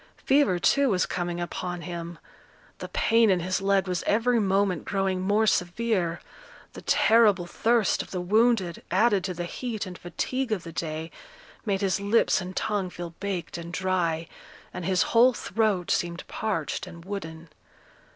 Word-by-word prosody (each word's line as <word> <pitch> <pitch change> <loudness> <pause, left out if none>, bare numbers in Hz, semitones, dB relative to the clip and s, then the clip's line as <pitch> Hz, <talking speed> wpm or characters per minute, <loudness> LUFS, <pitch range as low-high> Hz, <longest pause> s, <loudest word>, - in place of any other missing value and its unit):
Fever, 270 -9 +4
too, 280 +10 +3
was 185 -4 +2
coming 175 -1 -3
upon 175 0 -4
him; 170 0 -6 0.6
the - - -6
pain 230 -1 +3
in 185 -2 +3
his 185 +2 -1
leg 195 -1 +2
was 180 -1 -1
every 230 +3 +3
moment 195 -4 +1
growing 195 -2 -1
more 205 +4 +2
severe; 180 -2 0 0.5
the - - -9
terrible 215 -5 +4
thirst 225 +4 +1
of - - -9
the 185 - -4
wounded, 205 -1 +2
added 200 0 +3
to 185 -2 -3
the 175 +1 -3
heat 225 +3 -4
and 180 -2 -9
fatigue 245 +8 -3
of 195 -5 -1
the 165 - -8
day, 160 0 -4 0.6
made 195 -1 0
his 195 -1 +1
lips 205 0 +2
and 185 +1 -7
tongue 205 -4 -1
feel 175 -1 -7
baked 185 -4 -4
and 170 +1 -8
dry, 175 -4 0 0.5
and 180 - -5
his 185 -1 +2
whole 245 +2 +6
throat 215 -7 0
seemed 170 0 -1
parched 190 -4 -3
and 170 -2 -11
wooden. 165 -5 -7
185 Hz, 160 wpm, -26 LUFS, 175-215 Hz, 0.6 s, whole